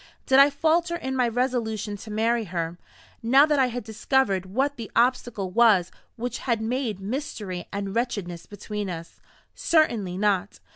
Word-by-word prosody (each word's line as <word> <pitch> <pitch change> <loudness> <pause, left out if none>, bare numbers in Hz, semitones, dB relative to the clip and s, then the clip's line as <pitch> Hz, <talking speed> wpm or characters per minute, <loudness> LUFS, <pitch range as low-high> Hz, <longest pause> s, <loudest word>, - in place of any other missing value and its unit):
Did 265 0 +5
I 280 +1 +8
falter 335 +3 +1
in 265 -5 -4
my 250 -2 +2
resolution 230 -4 -1
to 215 - -11
marry 225 +2 +1
her, 170 -1 -4 0.4
now 265 +5 +6
that 300 -2 +1
I 260 - +4
had 245 0 -5
discovered 220 -3 0
what 270 +9 0
the 230 -4 -7
obstacle 235 -5 +1
was 205 -5 +4 0.2
which 245 +1 -4
had 235 -4 0
made 225 -2 -2
mystery 205 - -5
and 200 -1 -4
wretchedness 205 -8 -3
between 210 -1 -5
us? 170 -1 -8 0.3
Certainly 230 - +1
not. 205 -1 0
225 Hz, 155 wpm, -25 LUFS, 200-255 Hz, 0.4 s, I